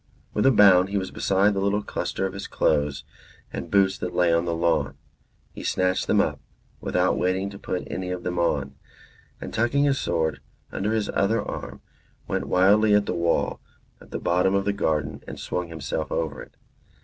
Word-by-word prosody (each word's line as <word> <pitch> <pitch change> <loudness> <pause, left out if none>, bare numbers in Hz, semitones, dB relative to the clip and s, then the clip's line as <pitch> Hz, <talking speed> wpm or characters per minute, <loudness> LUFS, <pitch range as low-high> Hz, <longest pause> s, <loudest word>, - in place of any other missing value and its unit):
With 105 - +2
a - - +7
bound 95 -5 +6
he 100 - -1
was 95 -1 -3
beside 100 +2 +2
the 100 - -1
little 100 +1 0
cluster 95 - -3
of 95 - -3
his 100 0 -6
clothes 75 -1 0 0.5
and 85 - -5
boots 95 0 +3
that 90 - -4
lay 85 -1 +3
on 85 +1 +2
the 85 -1 -1
lawn; 75 -5 0 0.5
he - - -9
snatched 95 0 0
them - - +3
up, - - +1 0.4
without - - +1
waiting 95 +2 0
to 100 - -10
put 90 - -3
any 90 -1 -4
of 90 -1 -4
them 90 -1 -2
on; 75 -5 0 0.7
and 70 - -7
tucking 120 +5 +2
his 140 -1 +2
sword 80 -1 -1 0.3
under 105 +3 -1
his 110 -2 -1
other 110 +4 +2
arm, - - -6 0.5
went - - -2
wildly 105 +3 +4
at 105 0 +3
the - - -2
wall 85 -1 0 0.4
at - - -15
the - - -4
bottom 90 +2 +1
of 100 0 +1
the 100 - +1
garden 80 -8 -1
and - - -7
swung 90 -1 -3
himself 80 -1 -4
over 80 -3 -2
it. - - -14
95 Hz, 195 wpm, -25 LUFS, 85-100 Hz, 0.7 s, a